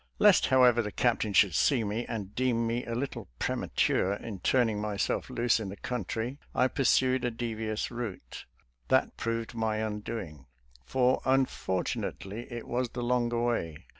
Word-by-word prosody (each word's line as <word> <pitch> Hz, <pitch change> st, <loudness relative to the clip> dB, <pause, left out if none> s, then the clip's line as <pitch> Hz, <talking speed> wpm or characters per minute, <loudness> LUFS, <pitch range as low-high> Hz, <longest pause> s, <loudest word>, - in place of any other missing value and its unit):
Lest, 210 Hz, -2 st, +5 dB
however, 125 Hz, -3 st, +5 dB
the 105 Hz, -2 st, -4 dB
Captain 115 Hz, -3 st, +1 dB
sltould 100 Hz, -2 st, +5 dB
see 120 Hz, -, +3 dB
me 110 Hz, +3 st, -3 dB
and 105 Hz, -3 st, -5 dB
deem 120 Hz, -1 st, +1 dB
me 115 Hz, +2 st, -1 dB
a 115 Hz, -, -3 dB
little 135 Hz, +3 st, -4 dB
premature 95 Hz, +9 st, +1 dB
in 100 Hz, -1 st, -6 dB
turning 115 Hz, 0 st, +2 dB
myself 105 Hz, -2 st, -1 dB
loose 120 Hz, -1 st, +2 dB
on 105 Hz, -3 st, -4 dB
the 100 Hz, -, -6 dB
country, 120 Hz, +4 st, -4 dB, 0.2 s
I 130 Hz, -, +3 dB
pursued 130 Hz, -1 st, +2 dB
a 125 Hz, -, +1 dB
devious 115 Hz, -2 st, -3 dB
route. 110 Hz, -, -6 dB, 0.4 s
That -, -, +2 dB
proved 115 Hz, 0 st, -3 dB
my 110 Hz, -2 st, -1 dB
undoing, 105 Hz, -, -5 dB, 0.4 s
for 130 Hz, 0 st, +2 dB
unfortunately 110 Hz, -4 st, -1 dB
it 120 Hz, -1 st, -6 dB
was 125 Hz, 0 st, -1 dB
the 120 Hz, 0 st, -5 dB
longer 120 Hz, -1 st, +1 dB
way. 85 Hz, -11 st, -2 dB
115 Hz, 155 wpm, -29 LUFS, 105-125 Hz, 0.4 s, Lest